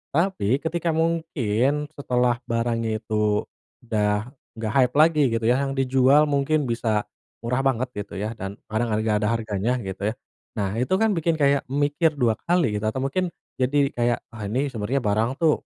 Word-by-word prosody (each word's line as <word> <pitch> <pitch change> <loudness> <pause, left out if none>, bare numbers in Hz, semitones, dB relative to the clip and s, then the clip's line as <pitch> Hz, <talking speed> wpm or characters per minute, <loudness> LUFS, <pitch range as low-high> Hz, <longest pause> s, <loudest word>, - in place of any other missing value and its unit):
tapi, 165 - +2
ketika 170 +1 -1
mungkin 150 -4 0
setelah 125 -3 +1
barangnya 115 -1 0
itu 105 -1 +1 0.4
udah 105 +1 0 0.3
nggak 110 -1 -3
hype 125 0 +3
lagi, 155 -2 +4
gitu 115 -1 -1
ya, 120 +2 +4
yang 135 0 -2
dijual 135 +2 +4
mungkin 145 +2 +2
bisa 110 -3 0 0.4
murah 125 +3 0
banget 130 0 0
gitu 100 - -7
ya, 105 +3 -2
dan 95 +1 -5 0.2
kadang 115 +2 0
lagi 105 +1 +1
nggak 105 -1 +2
ada 105 - +1
harganya, 110 0 -2
gitu 95 0 -6
ya. - - -3 0.4
Nah, 105 +1 -2
itu 125 +8 0
kan 220 +2 +2
bikin 165 -2 +1
kayak 140 -1 +3
mikir 145 +2 +1
2 120 -5 +2
kali, 165 -13 +2
gitu, 110 - -4
atau 115 +4 -1
mungkin 180 +7 0 0.3
jadi 140 +2 +2
kayak, 120 0 +1
"Ah, 110 -3 -6
ini 130 +7 0
sebenarnya 115 +5 -1
barang 110 +3 +1
tuh 160 -2 +3
125 Hz, 175 wpm, -24 LUFS, 110-145 Hz, 0.4 s, lagi